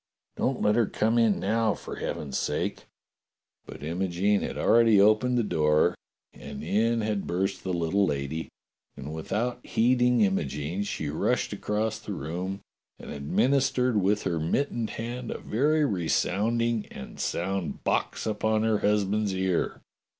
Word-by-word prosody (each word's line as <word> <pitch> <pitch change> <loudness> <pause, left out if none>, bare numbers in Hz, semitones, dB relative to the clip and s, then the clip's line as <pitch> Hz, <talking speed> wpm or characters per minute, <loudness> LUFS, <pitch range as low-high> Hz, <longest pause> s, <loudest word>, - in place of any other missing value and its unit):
Don't 130 -1 -1
let 105 - +4
her 115 -1 +3
come 110 +2 +1
in 110 -3 +3
now, 110 +1 +1
for - - -8
heaven's 70 -3 -4
sake!" - - -2 0.8
But - - -9
Imogene 95 +5 0
had - - -4
already 115 -3 +5
opened 110 +5 +4
the 120 - +2
door 75 -5 +2 0.4
and 70 0 -8
in 115 +7 +1
had 105 -2 -2
burst 95 +3 -1
the 95 - -2
little 90 +3 +1
lady, 70 +2 -3 0.5
and 75 +4 -6
without 115 +10 -2
heeding 125 0 +3
Imogene 85 -3 0
she 80 -7 -3
rushed 75 - 0
across 110 +1 -2
the 105 - -6
room 90 +4 -4 0.4
and - - -9
administered 125 - +1
with 100 +3 +1
her 85 -2 -1
mit 110 - 0
tened 115 -2 -2
hand 120 +1 -5
a - - -3
very 150 +6 +1
resounding 110 - 0
and 65 - -10
sound 95 0 -2
box - - -1
upon 110 0 0
her 110 -2 +2
husband's 105 -1 +1
ear. 95 -2 -1
105 Hz, 145 wpm, -27 LUFS, 85-115 Hz, 0.8 s, already